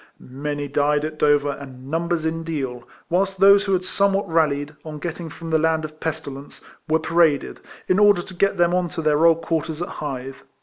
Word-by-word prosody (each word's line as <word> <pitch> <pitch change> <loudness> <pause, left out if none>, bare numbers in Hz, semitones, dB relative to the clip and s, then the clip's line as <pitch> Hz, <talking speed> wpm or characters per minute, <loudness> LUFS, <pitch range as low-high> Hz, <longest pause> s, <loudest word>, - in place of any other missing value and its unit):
Many 145 +2 -5
died 145 +1 +1
at 155 0 -6
Dover 145 -1 +3
and 135 -1 -10
numbers 165 0 -1
in 165 +1 -1
Deal; 130 -7 -4 0.2
whilst 190 +2 0
those 200 +1 +6
who 195 - 0
had 185 0 0
somewhat 200 +1 +1
rallied, 150 -3 +1
on 155 -1 -7
getting 165 +1 -5
from 165 +2 -8
the 160 - +3
land 160 0 +1
of 155 0 -10
pesti 155 -3 -4
lence, 140 +1 -11 0.3
were 160 - +4
paraded, 165 -3 +1 0.3
in 185 - +3
order 205 -4 +5
to 185 - -11
get 195 +3 +1
them 175 0 +3
on 180 -1 +1
to 165 +1 -5
their 155 +2 +4
old 165 0 +3
quarters 160 -1 -2
at 175 - -3
Hythe. 135 -2 -6
160 Hz, 205 wpm, -22 LUFS, 145-175 Hz, 0.3 s, those